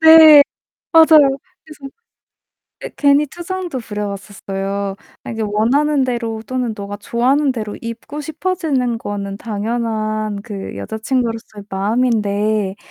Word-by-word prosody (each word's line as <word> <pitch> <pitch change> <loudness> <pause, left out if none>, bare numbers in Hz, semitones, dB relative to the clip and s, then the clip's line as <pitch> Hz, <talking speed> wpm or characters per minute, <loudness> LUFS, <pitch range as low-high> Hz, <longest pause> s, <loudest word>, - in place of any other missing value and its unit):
네, 320 -2 +9 0.5
맞아요. 315 -4 +7 0.3
그래서 295 -3 -11 0.9
예 - - -5
괜히 285 +1 +4
투정도 350 -1 -5
부려봤었어요. 200 -2 -4 0.3
"아 - - -6
이제 225 -1 -3
원하는 260 +8 +2
대로 230 -3 -3
또는 255 -3 -2
너가 205 0 -6
좋아하는 260 +7 +1
대로 215 -4 -5
입고 230 +6 -7
싶어지는 300 -6 -1
거는 200 -2 -5
당연한 215 -1 -2
그 200 - -7
여자친구로서의 220 - -3
마음인데 210 -1 0
230 Hz, 280 characters per minute, -18 LUFS, 205-280 Hz, 0.9 s, 네